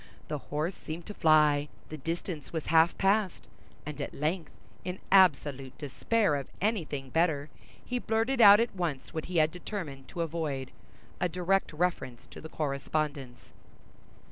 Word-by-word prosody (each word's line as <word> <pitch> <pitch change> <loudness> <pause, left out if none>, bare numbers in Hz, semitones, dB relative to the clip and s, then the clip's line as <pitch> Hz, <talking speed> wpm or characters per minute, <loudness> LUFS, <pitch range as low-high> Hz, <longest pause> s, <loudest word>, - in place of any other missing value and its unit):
The 150 - -2
horse 155 +5 -1
seemed 165 0 -7
to 210 - -7
fly—the 150 -2 +2
distance 165 0 -4
was 160 -2 -3
half 165 +1 +5
past—and 195 -6 -2
at - - -5
length, 160 +2 -1 0.3
in 180 +1 -4
absolute 145 -8 +3
despair 155 - +1
of 140 - -5
anything 155 - -2
better, 160 -3 +1 0.4
he 250 0 -2
blurted 230 +3 0
out 205 -1 +10
at 230 -3 0
once 165 -8 -3
what 160 -2 -3
he 180 -1 -3
had 155 0 +4
determined 170 -8 -6
to 175 - -5
avoid—a 160 +1 -4
direct 180 +3 +1
reference 150 -7 -2
to - - -10
the 160 - -9
correspondence. 140 -3 -3
160 Hz, 140 wpm, -30 LUFS, 145-185 Hz, 0.4 s, out